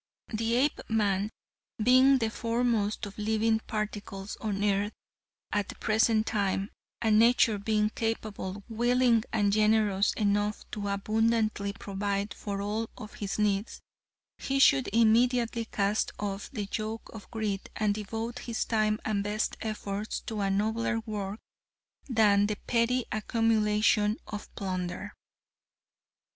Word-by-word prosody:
"The 225 +2 0
Apeman 215 -7 +1 0.5
being 255 +4 +6
the 225 -3 -1
foremost 230 -3 0
of 200 +1 -9
living 220 +1 +2
particles 205 -2 -4
on 205 -2 -2
earth 205 +1 +1 0.6
at 205 -1 0
the - - -7
present 220 0 +2
time, 200 -2 -1 0.3
and 215 -1 +4
nature 230 -2 +4
being 210 +1 +1
capable, 215 -4 -3
willing 240 0 +3
and 205 -3 +2
generous 210 -2 +3
enough 205 0 0
to 205 -1 -4
abundantly 215 0 +1
provide 200 +1 -3
for 200 -1 -4
all 215 +2 -2
of 215 -3 -9
his 200 -2 -4
needs, 210 0 0 0.6
he 275 - -1
should 135 - +5
immediately 230 +1 +3
cast 205 -1 0
off 200 -1 -4
the 210 -6 -4
yoke 220 +1 -4
of 215 -3 -10
greed 215 -4 -3
and 210 -2 +1
devote 225 +3 -4
his 235 -2 -3
time 215 -1 +1
and 205 -2 0
best 210 +1 -1
efforts 210 -1 -3
to 220 -3 -4
a 195 - +1
nobler 220 +4 0
work 210 -1 -5 0.7
than 205 -4 +4
the 210 - -1
petty 245 +1 +1
accumulation 215 -1 +2
of 210 -1 -7
plunder." 185 +1 -4
215 Hz, 130 wpm, -29 LUFS, 205-225 Hz, 0.7 s, being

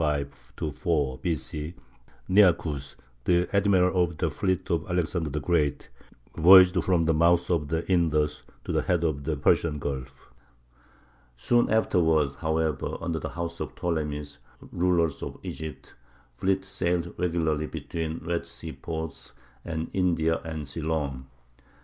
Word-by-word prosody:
C., 75 -3 +1 2.0
Nearchus, 85 -8 +3 0.3
the 90 0 +3
admiral 95 -2 +4
of 85 -2 -4
the - - 0
fleet 95 -1 -1
of 85 - -1
Alexander 85 -2 -1
the 75 - -2
Great, 75 -1 0 0.5
voyaged 90 +2 +7
from 90 -3 +2
the 80 - +3
mouth 85 +2 +3
of 80 -4 +1
the 80 +2 -2
Indus 75 -5 +1 0.2
to - - -4
the - - +1
head 85 -2 0
of 70 -4 -1
the 80 -2 -1
Persian 75 +2 +2
Gulf. 65 -2 -6 1.1
Soon 120 - +2
afterward, 80 -9 +3
however, 80 -3 -1
under 85 -1 -2
the - - -5
house 85 -1 -5
of - - -5
the - - -19
Ptolemies, 75 -4 -3 0.3
rulers 85 -3 +1
of - - -6
Egypt, 75 -4 -7 0.4
fleets 95 +6 0
sailed 85 -2 -1
regularly 80 -3 0
between 80 0 -5
Red 85 0 -2
Sea - - -8
ports 80 -2 -6 0.3
and 80 -1 -4
India 85 -3 +1
and 80 -3 -5
Ceylon. 75 -4 -3
80 Hz, 130 wpm, -27 LUFS, 75-90 Hz, 2.0 s, voyaged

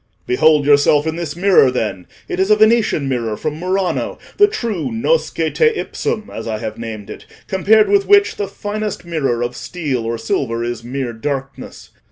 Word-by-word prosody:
"Behold 150 +3 +3
yourself 145 +1 +4
in 160 0 -2
this 165 -3 -4
mirror, 180 -6 +5
then; 105 -7 -3 0.2
it 180 - -4
is 190 +1 +2
a 215 - +6
Venetian 215 -9 +3
mirror 115 -5 -2
from 155 +4 -4
Murano, 185 +1 -1 0.2
the 410 - +6
true 235 - -3
nosce 355 - +1 0.2
teipsum, 445 - -1
as 110 - -6
I 110 -1 -2
have 110 0 -6
named 110 -3 -7
it, - - -11 0.2
compared 210 +3 +3
with 400 -1 +2
which 410 +1 +4
the 205 - -2
finest 210 -2 -5
mirror 135 -8 -1
of 120 +1 -4
steel 145 -9 -3
or 115 +1 -2
silver 115 +1 -2
is 120 -1 -4
mere 125 0 -4
darkness. 135 +2 -6
150 Hz, 175 wpm, -18 LUFS, -, 0.2 s, a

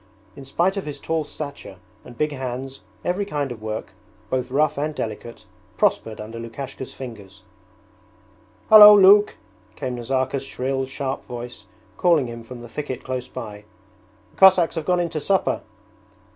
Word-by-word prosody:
In 140 - -11
spite 175 +8 0
of 195 - -3
his 145 - -6
tall 160 -1 -1
stature 140 -11 -8 0.3
and 120 - -13
big 150 0 0
hands 130 0 -5 0.3
every 180 +3 0
kind 145 -9 -3
of 115 -3 -8
work, 110 -2 -5 0.4
both 130 -1 -1
rough 145 +3 +1
and 150 +2 -3
delicate, 115 0 -6 0.3
prospered 110 -1 0
under 110 +2 -7
Lukashka's 130 +3 -7
fingers. 100 -7 -10 1.3
'Hallo, 210 -1 +11
Luke!' 205 +2 +6 0.4
came 125 - -4
Nazarka's 130 +2 -1
shrill, 135 0 -3
sharp 135 0 -4
voice 120 -4 -8 0.3
calling 170 -6 +3
him 115 -1 -7
from 120 +1 -10
the 120 - -9
thicket 130 -1 -6
close 130 -1 -4
by. 105 -2 -8 0.7
'The - - -28
Cossacks 185 -3 +6
have 160 -2 -4
gone 180 +1 +2
in 170 - -2
to 160 -1 -3
supper.' 190 +5 0
135 Hz, 155 wpm, -22 LUFS, 120-155 Hz, 1.3 s, Hallo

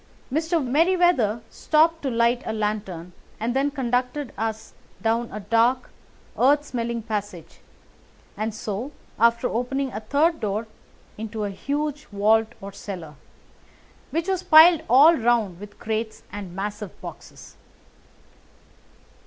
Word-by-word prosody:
Mr. 320 0 0
Merryweather 305 - +2
stopped 325 +1 +2
to 275 - -1
light 235 +1 +2
a 220 - -1
lantern, 205 -5 -3 0.3
and 235 +3 -2
then 275 +2 +2
conducted 250 -1 -2
us 220 +1 -4 0.3
down 230 +1 0
a 210 - -6
dark, 230 +5 +1 0.5
earth 290 +3 +4
smelling 235 -3 -3
passage, 205 -6 -5 0.8
and 215 +1 -2
so, 220 +5 -5 0.3
after 235 +2 +3
opening 260 +3 -2
a 210 - -3
third 295 +9 +1
door, 210 +2 -2 0.5
into 220 0 -4
a 205 - -2
huge 295 +6 -3
vault 215 +2 +2
or 200 0 -7
cellar, 175 -7 -8 1.0
which 330 +3 -2
was 380 -2 0
piled 325 0 +7
all 295 +7 +7
round 225 - +1
with 205 0 -11
crates 220 0 -4
and 195 -4 -7
massive 205 0 -5
boxes. - - -11
230 Hz, 125 wpm, -24 LUFS, 210-285 Hz, 1.0 s, piled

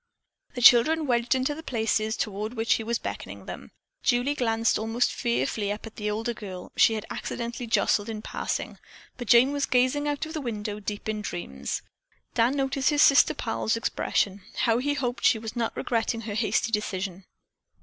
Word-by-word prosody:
The 245 - -3
children 305 +7 +7
wedged 240 -1 +2
into 260 +3 0
the 310 - -8
places 220 -5 0
toward 215 +3 -3
which 225 0 +2
he 225 - -1
was 235 +1 0
beckoning - - -7
them. - - -8 0.3
Julie 250 +3 +2
glanced 230 -5 +1
almost 225 +2 0
fearfully 225 -4 -1
up 210 +2 -5
at 225 - -11
the 210 -1 -2
older 225 +3 -2
girl 190 -5 -8
she 225 - +5
had 215 - -4
accidentally 235 0 -4
jostled 215 -1 +2
in 215 -1 -5
passing, - - -4 0.4
but 245 -2 -6
Jane 240 +5 +6
was 285 -1 -1
gazing 255 +4 +2
out 290 +1 -1
of 315 - -8
the 310 - -3
window 210 -4 -4
deep 205 0 -5
in 215 -1 -2
dreams. 70 - -4 0.5
Dan 240 +5 +2
noticed 270 -1 +1
his 295 -1 +4
sister 275 -2 +6
pal's 225 -1 -1
expression. 200 -3 -1 0.2
How 230 0 +3
he 290 +3 0
hoped 245 -4 -3
she - - +5
was 220 +1 -7
not 235 -1 -2
regretting 230 -1 -1
her 215 -2 -5
hasty 225 +1 0
decision. 195 -3 -3
230 Hz, 180 wpm, -26 LUFS, 215-255 Hz, 0.5 s, children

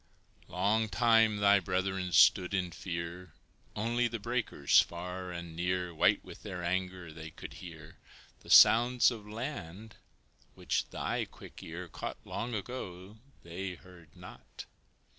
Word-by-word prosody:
Long 105 +5 +1
time 115 -2 +4
thy 100 0 +5
brethren 95 0 -2
stood 90 +4 +5
in 90 -2 -1
fear; 85 0 -6 0.4
Only 120 +3 0
the 115 0 -4
breakers 110 - +2
far 90 +1 -6
and 85 -2 -7
near, 90 0 -2
White 80 - +2
with - - -11
their 90 -3 -6
anger, 90 -1 -3
they 80 0 -9
could - - -10
hear; 80 -3 -11 0.4
The - - -16
sounds 120 +2 +7
of 110 -3 -8
land, 110 - -7 0.6
which - - -2
thy - - -2
quick - - -13
ear 85 +2 -7
Caught - - -6
long 115 +4 -4
ago, 100 -3 -7 0.3
they 90 +2 -5
heard 90 -4 -17
not. - - -12
95 Hz, 135 wpm, -31 LUFS, 85-110 Hz, 0.6 s, sounds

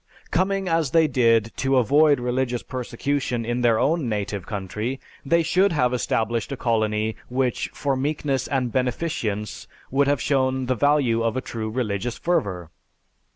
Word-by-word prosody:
Coming 195 +2 +1
as 165 -4 +1
they 160 -1 +5
did, 115 -4 +3
to 135 0 +2
avoid 145 +4 +4
religious 125 0 -1
persecution 125 -1 -2
in 120 +1 -1
their 115 -2 +4
own 155 -2 +1
native 100 -3 -3
country, 105 +6 -4 0.2
they 170 +4 +2
should 185 +4 +3
have 125 -5 +2
established 115 -1 -1
a 140 - -3
colony 110 -2 0
which 125 -1 -1
for 140 -2 -1
meekness 140 -1 -1
and 130 -3 -1
beneficence 125 - -2 0.2
would 140 +1 +2
have 145 -1 +2
shown 130 -2 +1
the 130 - +1
value 130 -2 +2
of 115 +1 0
a - - +2
true 110 -4 -5
religious 115 -1 -2
fervor. 95 - -1
125 Hz, 155 wpm, -23 LUFS, 115-140 Hz, 0.2 s, they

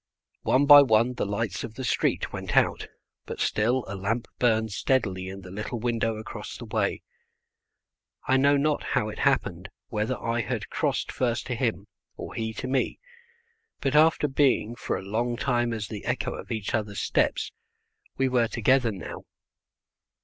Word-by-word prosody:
One 135 +2 +3
by 145 0 +11
one 120 -1 +3
the 120 - -2
lights 105 +2 -2
of 115 -1 -7
the 130 - -5
street 125 - 0
went - - -3
out, - - +2 0.4
but - - -6
still 120 +4 +1
a 95 - -5
lamp 110 +5 -2
burned 110 -3 +2
steadily 100 -5 0
in 95 +1 -8
the 90 -1 -11
little 105 +5 -4
window 115 -1 0
across 110 - -7
the - - -8
way. - - -1 1.2
I 130 - +4
know 140 +2 +4
not 150 +1 +1
how - - -1
it - - -8
happened, - - 0 0.2
whether 110 +4 -1
I 115 +1 -1
had 105 - -4
crossed - - -1
first 120 -2 -1
to 125 - -3
him 115 -6 -1 0.3
or - - -7
he 110 -1 -3
to 130 - -5
me, 130 0 0 0.8
but, 135 +1 0
after 155 0 +5
being 135 -5 +2
for - - -2
a - - -7
long 120 +4 -1
time 120 -2 +1
as 110 -3 -3
the 105 -1 -7
echo 125 +1 -1
of - - -8
each 110 -3 -3
other's 105 -3 -1
steps, - - 0 0.7
we 135 - +2
were 125 -2 +2
together 120 +2 +2
now. 95 -4 -8
115 Hz, 170 wpm, -26 LUFS, 110-130 Hz, 1.2 s, by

